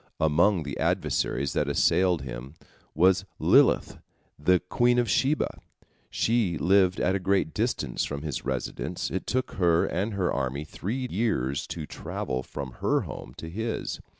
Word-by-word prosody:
Among 85 Hz, +4 st, +3 dB
the 70 Hz, -3 st, -6 dB
adversaries 70 Hz, +2 st, 0 dB
that 75 Hz, -, 0 dB
assailed 85 Hz, +3 st, +2 dB
him 65 Hz, +2 st, -7 dB, 0.4 s
was 95 Hz, +4 st, +4 dB
Lilith, -, -, +4 dB, 0.4 s
the 90 Hz, +5 st, +4 dB
queen 120 Hz, +7 st, +2 dB
of 120 Hz, -1 st, +2 dB
Sheba. 140 Hz, +6 st, +1 dB, 0.5 s
She 110 Hz, -7 st, +1 dB
lived 95 Hz, +1 st, +3 dB
at 95 Hz, -, +2 dB
a 95 Hz, -, 0 dB
great 95 Hz, -3 st, +1 dB
distance -, -, -1 dB
from 70 Hz, 0 st, -4 dB
his 75 Hz, -5 st, -4 dB
residence, 65 Hz, -2 st, -3 dB
it 95 Hz, -, -3 dB
took 130 Hz, +1 st, -1 dB
her 85 Hz, -3 st, +3 dB
and 100 Hz, +4 st, -2 dB
her 95 Hz, -3 st, 0 dB
army 70 Hz, +1 st, -2 dB
three 115 Hz, -, -4 dB
years 70 Hz, -, 0 dB
to 80 Hz, -, -5 dB
travel 65 Hz, -2 st, -4 dB
from 70 Hz, 0 st, -7 dB
her -, -, +2 dB
home -, -, -8 dB
to 80 Hz, -, -7 dB
his. 110 Hz, +7 st, -3 dB
90 Hz, 150 wpm, -27 LUFS, 70-100 Hz, 0.5 s, was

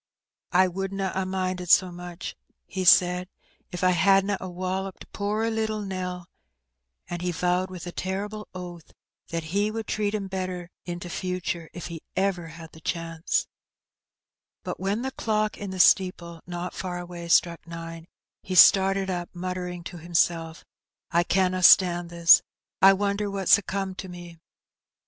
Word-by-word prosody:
"I 185 Hz, +1 st, +5 dB
wouldna 195 Hz, +1 st, -3 dB
a 190 Hz, 0 st, -2 dB
minded 185 Hz, -1 st, -2 dB
so 185 Hz, +1 st, +5 dB
much/* 175 Hz, 0 st, -7 dB, 0.3 s
he 190 Hz, -1 st, -4 dB
said, 180 Hz, 0 st, +5 dB, 0.4 s
^'if 180 Hz, +1 st, -5 dB
I 185 Hz, -, +5 dB
hadna 195 Hz, +3 st, +3 dB
a 185 Hz, -, -5 dB
wolloped 185 Hz, +1 st, -4 dB
poor 210 Hz, +2 st, -1 dB
little 220 Hz, -1 st, -2 dB
Nell;^* 180 Hz, -2 st, -4 dB, 0.8 s
and 175 Hz, -1 st, -5 dB
he 180 Hz, 0 st, -1 dB
vowed 180 Hz, +2 st, 0 dB
with 180 Hz, -2 st, -8 dB
a 175 Hz, -, -5 dB
terrible 205 Hz, +4 st, -4 dB
oath 175 Hz, -3 st, -9 dB, 0.4 s
that 165 Hz, -1 st, -3 dB
'^ -, -, -11 dB
he 205 Hz, +4 st, +1 dB
would 220 Hz, 0 st, -4 dB
treat 210 Hz, 0 st, -1 dB
'em 205 Hz, -2 st, -3 dB
better 185 Hz, -2 st, -4 dB
in 175 Hz, -1 st, -5 dB
t* 175 Hz, -, -7 dB
future, 175 Hz, -2 st, -3 dB
if 175 Hz, -, -8 dB
he 165 Hz, -2 st, -7 dB
ever 190 Hz, -3 st, 0 dB
had 165 Hz, 0 st, -11 dB
the 160 Hz, -, -15 dB
chance/* 165 Hz, -1 st, -2 dB, 1.2 s
But -, -, -5 dB
when 200 Hz, +5 st, -1 dB
the 265 Hz, -, -2 dB
clock 215 Hz, -3 st, -1 dB
in 200 Hz, -, -5 dB
the 190 Hz, 0 st, -6 dB
steeple 170 Hz, -2 st, +3 dB
not 175 Hz, 0 st, -5 dB
far 180 Hz, -1 st, -4 dB
away 175 Hz, -1 st, -7 dB
struck 170 Hz, 0 st, +2 dB
nine, 165 Hz, 0 st, -8 dB, 0.3 s
he 185 Hz, -, -5 dB
started 195 Hz, +1 st, +6 dB
up, 175 Hz, -1 st, -3 dB
muttering 180 Hz, -1 st, -4 dB
to 175 Hz, +1 st, -8 dB
himself, 165 Hz, -1 st, 0 dB, 0.2 s
*' -, -, -49 dB
I 170 Hz, +1 st, +3 dB
canna 185 Hz, 0 st, +1 dB
stand 175 Hz, -1 st, +6 dB
this: 170 Hz, -1 st, +6 dB, 0.4 s
I 195 Hz, 0 st, +9 dB
wonder 200 Hz, +1 st, -1 dB
what's 195 Hz, 0 st, +4 dB
comed 195 Hz, -1 st, -3 dB
to 190 Hz, -, -6 dB
me 175 Hz, -2 st, -10 dB
180 Hz, 165 wpm, -26 LUFS, 175-195 Hz, 1.2 s, I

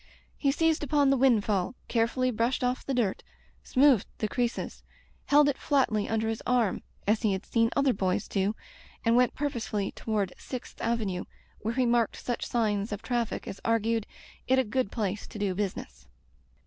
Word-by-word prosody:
He 280 Hz, -, +1 dB
seized 325 Hz, +2 st, +2 dB
upon 285 Hz, -1 st, +3 dB
the -, -, +4 dB
windfall, 220 Hz, -5 st, +2 dB
carefully 245 Hz, +2 st, +1 dB
brushed 235 Hz, +3 st, 0 dB
off 250 Hz, +1 st, 0 dB
the 270 Hz, -, -2 dB
dirt, 220 Hz, -6 st, 0 dB, 0.4 s
smoothed 260 Hz, -5 st, +4 dB
the 215 Hz, -, -1 dB
creases, 240 Hz, +2 st, -2 dB, 0.4 s
held 290 Hz, 0 st, +5 dB
it 285 Hz, -, 0 dB
flatly 235 Hz, -8 st, +1 dB
under 225 Hz, 0 st, 0 dB
his 225 Hz, 0 st, -2 dB
arm 245 Hz, -5 st, +2 dB, 0.2 s
as 215 Hz, +2 st, +2 dB
he 215 Hz, -4 st, +2 dB
had 190 Hz, +1 st, -4 dB
seen 230 Hz, -1 st, +2 dB
other 275 Hz, -2 st, +3 dB
boys 190 Hz, +1 st, -1 dB
do, 200 Hz, +2 st, 0 dB, 0.5 s
and 230 Hz, +1 st, +4 dB
went 250 Hz, 0 st, +3 dB
purposefully 235 Hz, -8 st, -2 dB
toward 210 Hz, -4 st, -2 dB
Sixth 255 Hz, -2 st, -7 dB
Avenue, 215 Hz, -6 st, -1 dB, 0.3 s
where 225 Hz, +2 st, -3 dB
he 255 Hz, -1 st, +2 dB
marked 235 Hz, -2 st, +2 dB
such 245 Hz, -, -4 dB
sign^ 215 Hz, -3 st, 0 dB
of 205 Hz, 0 st, -4 dB
traffic 240 Hz, -3 st, -2 dB
as 195 Hz, -, -7 dB
argued 230 Hz, -1 st, +1 dB, 0.4 s
it 260 Hz, -, +4 dB
a 260 Hz, -, +4 dB
good 250 Hz, -1 st, -1 dB
place 205 Hz, -3 st, -2 dB
to -, -, -9 dB
do 200 Hz, -2 st, 0 dB
busi^ 195 Hz, 0 st, -2 dB
ness. 65 Hz, +1 st, -10 dB
230 Hz, 175 wpm, -28 LUFS, 210-255 Hz, 0.5 s, held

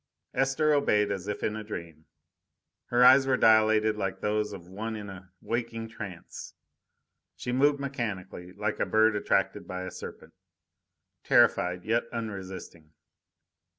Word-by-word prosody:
Esther 135 Hz, +3 st, +2 dB
obeyed 105 Hz, -8 st, +2 dB
as 95 Hz, -1 st, -4 dB
if 105 Hz, -, -4 dB
in 105 Hz, -, -1 dB
a 110 Hz, -, -5 dB
dream. 85 Hz, -7 st, -8 dB, 0.8 s
Her 120 Hz, +1 st, +4 dB
eyes 135 Hz, +1 st, +7 dB
were 130 Hz, -1 st, +3 dB
dilated 110 Hz, -1 st, +4 dB
like 95 Hz, -2 st, -3 dB
those 105 Hz, 0 st, -1 dB
of 90 Hz, -4 st, -9 dB
one 110 Hz, +4 st, -5 dB
in 105 Hz, -2 st, -7 dB
a 95 Hz, -1 st, -12 dB
waking 115 Hz, -1 st, -3 dB
trance. 100 Hz, -6 st, -9 dB, 0.8 s
She 125 Hz, -, -5 dB
moved 140 Hz, +3 st, +3 dB
mechanically, 105 Hz, -10 st, -5 dB
like 105 Hz, +1 st, -3 dB
a -, -, +1 dB
bird 110 Hz, 0 st, +4 dB
attracted 105 Hz, -, 0 dB
by 90 Hz, 0 st, -5 dB
a 90 Hz, -, -6 dB
serpent, -, -, -10 dB, 0.9 s
terrified, 90 Hz, 0 st, +3 dB
yet 115 Hz, +2 st, +1 dB
unresisting. 95 Hz, -8 st, -7 dB
105 Hz, 140 wpm, -28 LUFS, 95-115 Hz, 0.9 s, eyes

